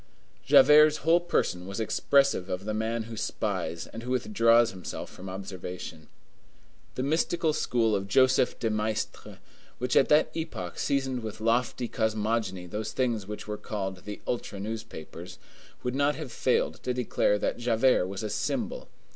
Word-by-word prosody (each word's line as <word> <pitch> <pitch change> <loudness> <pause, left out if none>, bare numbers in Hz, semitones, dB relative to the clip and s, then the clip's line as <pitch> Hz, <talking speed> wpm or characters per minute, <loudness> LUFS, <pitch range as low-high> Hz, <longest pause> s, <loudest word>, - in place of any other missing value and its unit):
Javert's 150 +2 +7
whole 165 +2 +6
person 95 - -1
was 100 +3 -5
expressive 135 -2 +2
of 90 +2 -3
the 110 - -2
man 110 +1 -1
who 115 +1 -8
spies 95 -6 -3
and 115 - -9
who 120 - -7
withdraws 120 - +3
himself 95 -1 -7
from 95 +1 -9
observation. 90 -4 -7 0.9
The 130 - -2
mystical 160 +2 +1
school 115 -6 +1
of 100 0 -2
Joseph 130 +4 +3
de 115 - -1
Maistre, 110 0 -3 0.4
which 125 0 -1
at 135 - +5
that 150 +1 +4
epoch 115 - -5
seasoned 135 -3 0
with 110 -1 -6
lofty 120 +2 0
cosmogony 110 -4 -1
those 105 +5 -4
things 115 -6 -1
which 105 0 -7
were 105 0 -3
called 95 -3 -4
the 105 0 -6
ultra 115 -4 -3
newspapers, 95 -5 -7 0.5
would 125 - -1
not 140 +2 +2
have 150 -4 -7
failed 125 - 0
to 125 -1 -2
declare 120 -4 +1
that 105 - -2
Javert 120 -4 +3
was 95 +2 -5
a 110 - -2
symbol. - - -2
110 Hz, 155 wpm, -28 LUFS, 100-130 Hz, 0.9 s, Javert's